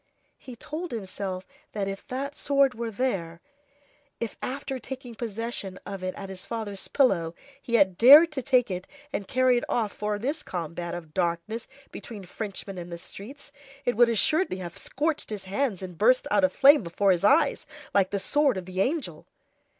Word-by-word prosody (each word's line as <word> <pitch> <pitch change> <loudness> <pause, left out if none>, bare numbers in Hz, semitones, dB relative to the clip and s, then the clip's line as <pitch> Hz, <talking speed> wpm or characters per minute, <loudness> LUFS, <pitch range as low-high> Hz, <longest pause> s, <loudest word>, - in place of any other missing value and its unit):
He 255 - -10
told 315 +8 -6
himself 190 -3 -4 0.3
that 200 -2 -2
if 195 0 -6
that 275 +3 -4
sword 275 -2 +2
were 235 0 -4
there, 195 -8 -2 0.8
if 230 - -4
after 270 0 -4
taking 250 0 -7
possession 225 -4 -4
of 195 -2 -6
it 185 0 -3
at 195 - -7
his 190 -1 -8
father's 215 -4 -4
pillow, 175 - +2 0.3
he 235 - -1
had 190 -5 +3
dared 295 +7 +9
to 285 -3 -3
take 250 -4 +2
it 185 0 -4 0.3
and 200 - -3
carry 255 0 +3
it - - -10
off 220 -4 0
for 210 0 -2
this 280 +8 -2
combat 170 - -5
of 165 -3 -9
darkness 180 +6 -2 0.2
between 205 -5 -8
Frenchmen 195 0 -6
in 175 0 -7
the 170 - -6
streets, 255 +12 -10 0.3
it 245 - +1
would 240 +1 +6
assuredly 235 - +2
have 175 -2 -7
scorched 305 +2 -2
his 210 -3 -5
hands 200 0 -1
and 180 -3 -8
burst 255 +6 +4
out 290 - +3
aflame 280 0 +6
before 195 +2 +1
his 175 -1 +1
eyes, 275 +10 +3 0.3
like 195 -2 +3
the 200 - -1
sword 275 +5 +2
of 185 - -5
the 185 +1 -2
angel! 245 - -2
215 Hz, 180 wpm, -27 LUFS, 185-260 Hz, 0.8 s, dared